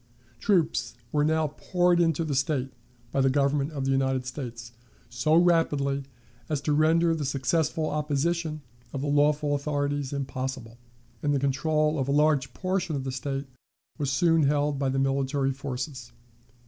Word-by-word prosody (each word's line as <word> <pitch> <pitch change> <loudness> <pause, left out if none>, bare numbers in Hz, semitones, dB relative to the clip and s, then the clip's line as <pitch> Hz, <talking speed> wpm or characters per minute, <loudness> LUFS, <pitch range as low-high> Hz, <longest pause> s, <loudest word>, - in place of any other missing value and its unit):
Troops 180 - +1 0.2
were 150 -1 +2
now 160 +1 +2
poured 175 +4 +1
into 165 -1 +1
the 150 - -2
State 135 -1 0 0.4
by 135 - +1
the 135 - +4
Government 140 +2 +1
of 140 -3 -3
the 135 - +1
United 135 -1 +1
States 120 -2 -6 0.4
so 120 +7 +2
rapidly 145 -5 +2 0.4
as 150 -2 0
to 150 +1 0
render 165 +2 +3
the 160 -2 -2
successful 150 +4 0
opposition 155 +1 -1 0.3
of 135 - -3
the 145 - -2
lawful 145 0 +2
authorities 145 -1 -1
impossible, 130 -4 -4 0.4
and 145 -1 +1
the - - +1
control 150 +3 +1
of 135 - -1
a - - 0
large 145 -3 +2
portion 185 0 -2
of 135 - -3
the 135 - -3
State 135 +1 -3 0.5
was 140 -2 0
soon 165 +4 +3
held 145 0 +1
by 135 -1 +1
the 135 - -1
military 135 0 +1
forces. 130 -2 -5
145 Hz, 160 wpm, -27 LUFS, 135-155 Hz, 0.5 s, the